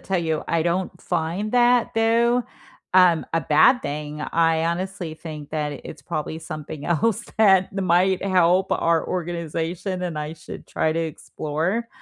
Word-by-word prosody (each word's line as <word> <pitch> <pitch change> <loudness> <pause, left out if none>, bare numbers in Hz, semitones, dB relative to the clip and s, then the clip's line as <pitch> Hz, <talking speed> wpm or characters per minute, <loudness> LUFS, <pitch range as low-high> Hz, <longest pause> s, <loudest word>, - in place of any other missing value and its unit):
tell 190 -1 -1
you, 160 -2 -1
I 165 -1 +1
don't 175 +2 -2
find 175 +7 -2
that, 245 -1 +3
though, 235 +2 +3 0.5
um, 180 -3 +5
a 165 - +2
bad 160 - +4
thing. 150 +1 -5
I 165 +1 +1
honestly 175 -1 -3
think 155 -2 -9
that 150 -2 -3
it's 140 - -9
probably 155 +3 -4
something 155 -2 -7
else 210 +7 0
that 190 -4 +5
might 185 0 +2
help 185 0 +3
our 165 -1 +1
organization 175 +1 -3
and 170 -4 -3
I 150 +1 -4
should - - -10
try 160 - 0
to 165 - -1
explore. 165 +6 -3
170 Hz, 150 wpm, -23 LUFS, 160-190 Hz, 0.5 s, um